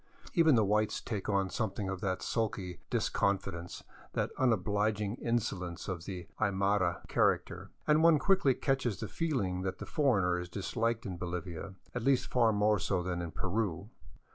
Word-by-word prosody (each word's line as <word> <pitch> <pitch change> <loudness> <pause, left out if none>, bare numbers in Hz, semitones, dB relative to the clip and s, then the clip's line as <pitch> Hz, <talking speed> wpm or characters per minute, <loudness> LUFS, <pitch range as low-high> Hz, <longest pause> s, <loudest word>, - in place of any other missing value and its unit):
Even 160 -6 +5
the 110 -3 +4
whites 105 +1 +1
take 105 -4 -4
on 95 -2 +1
something 105 -3 -2
of 95 -1 -4
that 95 -2 -1
sulky 110 -6 -2
disconfidence, 90 -3 -1 0.3
that - - -1
unobliging 105 -3 +1
insolence 100 -7 -2
of 90 -3 -4
the 90 -4 -6
Aymara 100 -3 +1
character, - - +1 0.2
and 150 +1 +4
one 165 -1 +7
quickly 185 -6 +3
catches 130 - 0
the - - -3
feeling 120 - -1
that 95 0 -3
the - - -6
foreigner 100 - +2
is 90 0 -6
disliked 115 +5 -1
in 95 -4 -4
Bolivia, 90 +1 -5 0.2
at 125 - -2
least 135 +1 +2
far 120 -3 +4
more 105 0 +3
so 90 -1 0
than 90 -1 -2
in 85 - -4
Peru. 95 +2 -2
100 Hz, 160 wpm, -32 LUFS, 90-115 Hz, 0.3 s, one